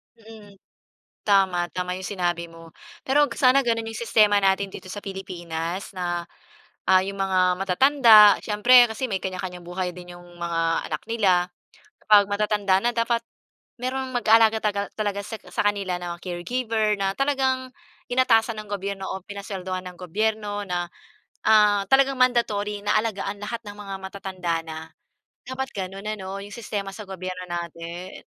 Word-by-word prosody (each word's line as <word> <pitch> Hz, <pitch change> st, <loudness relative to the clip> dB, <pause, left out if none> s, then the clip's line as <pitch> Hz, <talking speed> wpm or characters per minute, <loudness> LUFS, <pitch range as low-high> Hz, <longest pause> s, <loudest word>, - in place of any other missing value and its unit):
Mm. 220 Hz, -3 st, -15 dB, 0.7 s
Tama, 190 Hz, -3 st, +3 dB
tama 180 Hz, 0 st, -2 dB
yung 185 Hz, -, -5 dB
sinabi 175 Hz, -3 st, -2 dB
mo. 165 Hz, 0 st, -14 dB, 0.3 s
Pero 290 Hz, +2 st, +3 dB
'wag -, -, -8 dB
sana 260 Hz, +1 st, +5 dB
ganun 230 Hz, -3 st, -1 dB
yung 220 Hz, -, -7 dB
sistema 210 Hz, -3 st, +4 dB
natin 195 Hz, 0 st, +1 dB
dito 185 Hz, -, -10 dB
sa 205 Hz, +2 st, -7 dB
Pilipinas 180 Hz, -2 st, -5 dB
na, 175 Hz, -2 st, -3 dB, 0.6 s
ah, 185 Hz, 0 st, +5 dB
yung 195 Hz, +1 st, -5 dB
mga 185 Hz, -2 st, +2 dB
matatanda, 215 Hz, +2 st, +6 dB
siyempre 240 Hz, +4 st, +6 dB
kasi 235 Hz, +3 st, -4 dB
may 195 Hz, -, 0 dB
kanya-kanyang 185 Hz, -2 st, -6 dB
buhay 180 Hz, +1 st, -3 dB
din 180 Hz, 0 st, -10 dB
yung 175 Hz, -, -15 dB
mga 170 Hz, -1 st, -2 dB, 0.3 s
anak -, -, -4 dB
nila. 185 Hz, -6 st, +2 dB, 0.6 s
Kapag 205 Hz, -1 st, +8 dB
matatanda 205 Hz, -1 st, +1 dB
na 240 Hz, -, +2 dB
dapat 230 Hz, 0 st, 0 dB, 0.6 s
merong 260 Hz, +2 st, -3 dB
mag-aalaga 225 Hz, -2 st, +5 dB
tagal 205 Hz, -1 st, -1 dB
talaga 205 Hz, -1 st, -1 dB
sa 225 Hz, -, -6 dB
sa -, -, -1 dB
kanila 200 Hz, -3 st, 0 dB
'no, 175 Hz, -1 st, -5 dB
caregiver 215 Hz, +3 st, -1 dB
na 195 Hz, 0 st, 0 dB
talagang 265 Hz, -2 st, 0 dB, 0.4 s
inatasan 230 Hz, -3 st, +3 dB
ng 210 Hz, -, -15 dB
gobyerno 195 Hz, -1 st, -4 dB
o 190 Hz, -, -6 dB
pinaswelduhan 190 Hz, -2 st, -5 dB
ng 180 Hz, -1 st, -9 dB
gobyerno 205 Hz, +2 st, -2 dB
na, 175 Hz, -2 st, -3 dB, 0.6 s
ah, 210 Hz, -2 st, +5 dB
talagang 275 Hz, 0 st, +4 dB
mandatory 210 Hz, -5 st, +1 dB
na 210 Hz, -, +2 dB
alagaan 205 Hz, -2 st, -3 dB
lahat 230 Hz, +2 st, -4 dB
ng 205 Hz, -, -8 dB
mga 200 Hz, -1 st, -7 dB
matatanda 185 Hz, -3 st, -4 dB
na. 160 Hz, -1 st, -7 dB, 0.7 s
Dapat 260 Hz, +1 st, -4 dB
gano'n 195 Hz, +1 st, -6 dB
ano, 190 Hz, 0 st, -6 dB
yung 205 Hz, -, -11 dB
sistema 205 Hz, -4 st, -4 dB
sa 210 Hz, 0 st, -8 dB
gobyerno 185 Hz, -1 st, -6 dB
natin. 170 Hz, +1 st, -6 dB
200 Hz, 150 wpm, -24 LUFS, 185-220 Hz, 0.7 s, Kapag